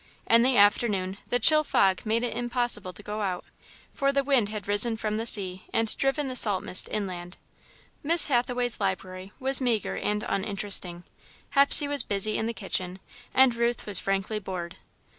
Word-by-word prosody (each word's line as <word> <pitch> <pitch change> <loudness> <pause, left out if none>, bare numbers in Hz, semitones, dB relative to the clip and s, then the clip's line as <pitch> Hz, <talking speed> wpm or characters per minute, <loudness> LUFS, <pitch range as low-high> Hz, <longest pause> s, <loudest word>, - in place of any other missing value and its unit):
In 230 0 +3
the 255 +1 +1
afternoon, 200 -2 +1
the 245 - -1
chill 305 +6 +3
fog 195 -7 0
made 225 +2 -1
it 245 - -4
impossible 240 -5 0
to 205 - -11
go 210 +1 -6
out, 185 -3 -4 0.5
for 275 0 -1
the 275 0 -1
wind 260 -7 0
had 210 -2 -8
risen 210 +3 +3
from 215 -1 -4
the 225 +1 -4
sea 185 -4 +2
and 225 -1 -1
driven 270 +1 -2
the 255 - -6
salt 205 -6 +4
mist 185 - -1
inland. 180 -3 -6 0.6
Miss 330 +3 +4
Hathaway's 245 -2 -1
library 190 -1 -5
was 265 +1 +3
meagre 235 -4 -2
and 210 0 -3
uninteresting, 195 -3 +1 0.5
Hepsey 280 +1 +5
was 285 0 +3
busy 205 +1 0
in 220 - -2
the - - -3
kitchen, 185 -2 -4 0.3
and 260 -2 +3
Ruth 235 0 -2
was 200 -3 +5
frankly 195 +2 -3
bored. 180 -3 -8
215 Hz, 175 wpm, -25 LUFS, 195-245 Hz, 0.6 s, Hepsey